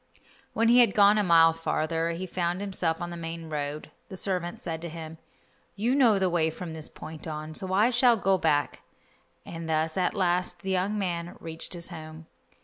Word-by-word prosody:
When 230 - +2
he 245 +1 +7
had 235 -5 +5
gone 205 +1 +6
a - - +2
mile 165 -2 +6
farther 165 0 -1
he 170 +2 -4
found 175 0 -2
himself 185 -5 -1
on 175 0 -5
the - - -6
main 165 -1 -6
road. 145 0 -4 0.2
The 190 - -8
servant 180 -3 -2
said 165 -2 -5
to 170 - -5
him, 160 0 -8 0.6
"You 230 +5 0
know 245 -7 +5
the 190 -1 +2
way 170 -2 +2
from 165 +1 -7
this 160 -1 -8
point 160 +1 -9
on, 155 0 -5
so 185 +4 -3
I 210 +6 +4
shall 245 -1 +4
go 195 -2 +2
back," 150 -3 +1 0.6
and 165 -1 -7
thus 160 +1 0
at 185 +2 +1
last 180 -2 0
the 190 - -2
young 190 +3 0
man 175 -3 -3
reached 165 +2 -6
his 170 0 -6
home. 160 -1 -9
170 Hz, 200 wpm, -27 LUFS, 160-190 Hz, 0.6 s, he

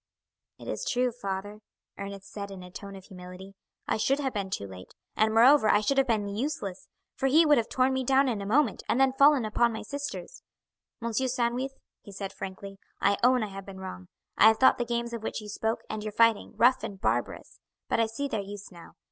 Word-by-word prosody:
"It - - -12
is - - -3
true, 250 0 +1
father," 205 -2 -5 0.4
Ernest 200 -1 -8
said 200 -1 -5
in 190 -2 -9
a 180 - -12
tone 200 +1 -9
of 190 - -11
humility. 180 +1 -11 0.3
"I - - +1
should 270 +5 +2
have 270 -3 -2
been 200 -3 -3
too 100 - -3
late, 95 -1 -11 0.2
and, 220 0 +3
moreover, 235 +1 +6
I 210 - +4
should 275 +6 +1
have 270 - +2
been 215 -4 0
useless, 200 -3 -4 0.3
for 270 - -1
he 315 +5 +5
would 295 -4 +5
have 225 - -3
torn 260 +1 +2
me 260 0 -1
down 270 +2 +3
in 225 -5 -1
a - - -5
moment, 250 -1 +2
and 245 - +2
then 265 -1 +4
fallen 280 -2 +5
upon 235 +2 +2
my 220 0 -5
sisters. 285 - -6 0.6
M. 235 -1 -2
Sandwith," 250 +1 -1 0.3
he 205 - -12
said 195 0 -6
frankly, 195 +1 -8 0.2
"I 200 0 +2
own 250 -1 +4
I 215 - -4
have 195 0 -8
been 190 -1 -9
wrong. 90 - -8 0.3
I 215 - +8
have 220 0 +5
thought 260 - +5
the 240 - 0
games 235 0 -2
of 230 - -4
which 220 - -4
you 210 -1 -9
spoke, 220 +2 -2
and 215 - -4
your 215 -1 -5
fighting, 230 -1 +3
rough 245 +4 +4
and 195 -2 -6
barbarous; - - -2 0.3
but - - 0
I 225 - +3
see 230 +6 -3
their 220 -6 -2
use 200 0 -9
now. 170 -2 -14
220 Hz, 225 wpm, -28 LUFS, 200-255 Hz, 0.6 s, I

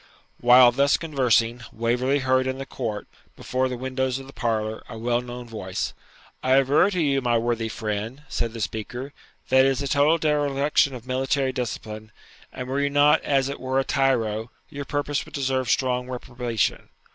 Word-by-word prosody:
While 125 0 +7
thus 140 +3 +3
conversing, 125 -6 +1
Waverley 120 +4 0
heard 130 -1 +1
in 130 0 -2
the 135 - -5
court, 110 -7 -5 0.3
before 130 0 -1
the 125 - -4
windows 130 0 -2
of 135 - -9
the 135 - -13
parlour, 110 -2 -2
a 110 - -7
well 120 +1 0
known 125 0 -8
voice. 105 -3 -4 0.5
'I 130 0 +3
aver 140 +8 +4
to 185 -3 -2
you, 140 -4 +2
my 120 -2 +2
worthy 115 -1 -1
friend,' 110 +5 -4
said 115 -4 -2
the 115 - -6
speaker, 120 +6 -5 0.4
'that 130 - +5
it - - +4
is 135 +1 0
a - - -2
total 145 +4 +3
dereliction 145 -2 +1
of 120 -1 -10
military 130 +1 0
discipline; 110 -3 -5 0.4
and 125 - -6
were 135 +2 -1
you 140 - +1
not 145 +2 +4
as 135 -2 +1
it 140 - -5
were 130 +1 0
a - - +1
tyro, 115 -6 0 0.2
your 145 -2 -6
purpose 145 +2 -1
would - - -12
deserve 130 -3 -1
strong 125 0 0
reprobation. 120 -3 -2
130 Hz, 180 wpm, -24 LUFS, 120-135 Hz, 0.5 s, While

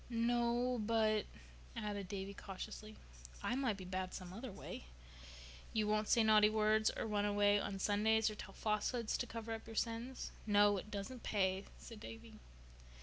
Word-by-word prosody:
"No, 240 +1 +1
but—" 215 -1 +2 0.5
added 205 -4 -3
Davy 195 +1 -4
cautiously, 215 +2 -7 0.5
"I - - 0
might 250 -6 0
be 185 - -8
bad 185 0 -3
some 180 -1 -7
other 230 +4 -6
way." 190 - -8 0.9
"You 215 -1 +2
won't 215 0 +1
say 230 - +5
naughty 215 -1 +6
words, 215 0 +3
or - - -1
run 210 -2 0
away 205 0 +4
on 195 0 -3
Sundays, 215 +3 +3
or 215 - 0
tell 200 -2 -9
falsehoods 215 +2 0
to 245 - -2
cover 230 -1 -5
up 225 - -7
your 225 - -8
sins?" 230 +3 -2 0.2
"No. 205 -1 +5
It 200 - -6
doesn't 215 +4 -5
pay," 190 -1 +1
said 225 -2 -10
Davy. 225 0 -10
215 Hz, 165 wpm, -38 LUFS, 205-230 Hz, 0.9 s, naughty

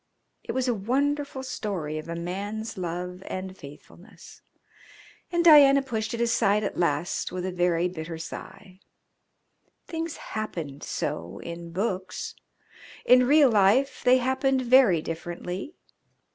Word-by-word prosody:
It - - -5
was 260 0 0
a 245 - +2
wonderful 275 +6 -1
story 190 -12 -4
of 155 - -9
a 170 - -3
man's 200 +6 -4
love 180 0 -5
and 185 0 -5
faithfulness, 145 -4 -14 0.9
and 345 -1 +1
Diana 280 -4 +8
pushed 225 -3 -3
it 235 - -3
aside 220 -3 +2
at - - -3
last 170 -1 -1
with 180 0 -4
a 185 - -2
very 175 -1 +1
bitter 165 -2 -6
sigh. 185 +3 -9 1.1
Things 330 -1 -4
happened 165 -10 -6
so 85 +1 -4
in 170 0 -7
books. 185 0 -3 0.7
In 250 0 +6
real 290 -2 +6
life 220 +7 +3
they 255 0 +6
happened 260 +1 +1
very 240 -10 +5
differently. 175 - -6
200 Hz, 130 wpm, -26 LUFS, 175-255 Hz, 1.1 s, Diana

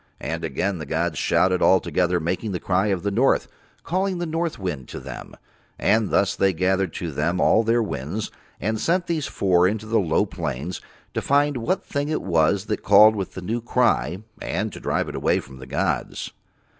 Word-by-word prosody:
And 80 +1 -4
again 85 +5 -1
the 75 - -6
gods 80 -1 -1
shouted 95 -1 +2
all 95 - +5
together 90 0 0
making 90 +5 -2
the 90 - -2
cry 95 +3 +1
of 95 -4 -1
the 100 - 0
north, 125 +7 +2 0.4
calling 185 +1 -1
the 175 - -2
north 165 -1 -2
wind 85 - -4
to - - -7
Them; - - -9 0.4
and 110 0 +2
thus 100 0 +2
They 95 -1 +2
gathered 95 +1 +1
to 85 -2 -4
Them 80 +6 -1
all 110 - +4
Their 115 +1 +2
winds 85 +4 -4 0.3
and 110 +2 -2
sent 180 +1 +1
these 160 -4 -1
four 90 -2 +3
down 100 - +1
into 110 0 -6
the 110 0 +2
low 85 -6 +2
plains 75 +9 -4 0.3
to - - -1
find 145 0 +2
what 175 +11 -1
thing 145 0 -2
it 155 - -1
was 90 +3 +2
that 110 - -2
called 105 +2 +7
with 95 -3 -4
the 95 - -6
new 115 +5 -2
cry, 110 - +1 0.2
and - - -2
to - - -8
drive - - -1
it - - -6
away - - +1
from 65 0 -12
the 65 - -10
gods. - - -2
95 Hz, 205 wpm, -23 LUFS, 85-115 Hz, 0.4 s, called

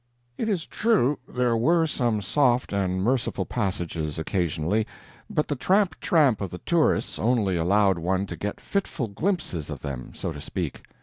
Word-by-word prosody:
It 225 - -2
is 185 -6 0
true, 195 - +2
there 125 -2 +1
were 165 +9 +3
some 120 -9 0
soft 125 +1 +2
and 95 -2 0
merciful 125 +3 0
passages 85 -8 -2
occasionally, 85 +4 0 0.4
but 150 - 0
the 145 - -1
tramp 185 +4 +2
tramp 140 - +3
of 95 - -2
the 90 - -7
tourists 165 - +1
only 110 -5 +2
allowed 95 +2 +3
one 95 +3 0
to - - -6
get 105 0 -4
fitful 170 - -2
glimpses 100 - -2
of 70 -5 -6
them, 70 -4 -6
so - - -3
to 75 - -8
speak. 80 -1 -4
105 Hz, 165 wpm, -26 LUFS, 90-145 Hz, 0.4 s, were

